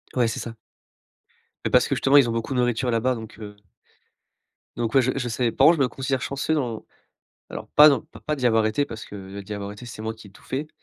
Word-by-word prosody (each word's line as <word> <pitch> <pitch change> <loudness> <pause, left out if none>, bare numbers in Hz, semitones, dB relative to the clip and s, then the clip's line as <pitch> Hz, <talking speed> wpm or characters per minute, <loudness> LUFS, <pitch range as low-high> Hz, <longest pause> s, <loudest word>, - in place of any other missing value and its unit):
Ouais, 120 -2 +3
c'est 115 - -3
ça. 115 -1 -7 1.1
Mais - - 0
parce - - +4
que - - 0
justement, 140 +2 +4
ils 125 -4 +5
ont - - 0
beaucoup 115 +4 -3
de 125 - 0
nourriture 120 +1 +1
là-bas, 120 +2 +1
donc 110 -1 -9
heu 105 -1 -9 1.2
Donc 115 -2 -2
ouais 135 - +6
je 130 - +1
je 130 -3 -2
savais. 120 0 0
Par 135 - +3
contre 170 - +7
je 140 - 0
me 130 - +4
considère 135 +1 -2
chanceux 140 +4 -2
dans 120 -7 -2 0.6
alors - - -8
pas 150 +1 +9
non, 140 - +2
p 155 - -15
pas 150 - 0
d'y 125 -3 0
avoir 110 -2 +3
été 110 +7 +1
parce 115 -5 -9
que - - -11 0.2
heu, 100 - -6
d'y 105 +2 -7
avoir 100 0 -5
été, 105 +4 -11
c'est 110 -2 -8
moi 110 0 -3
qui 110 -2 -14
ai - - -18
tout 95 - -19
fait. 145 +4 -4
120 Hz, 260 wpm, -24 LUFS, 110-135 Hz, 1.2 s, pas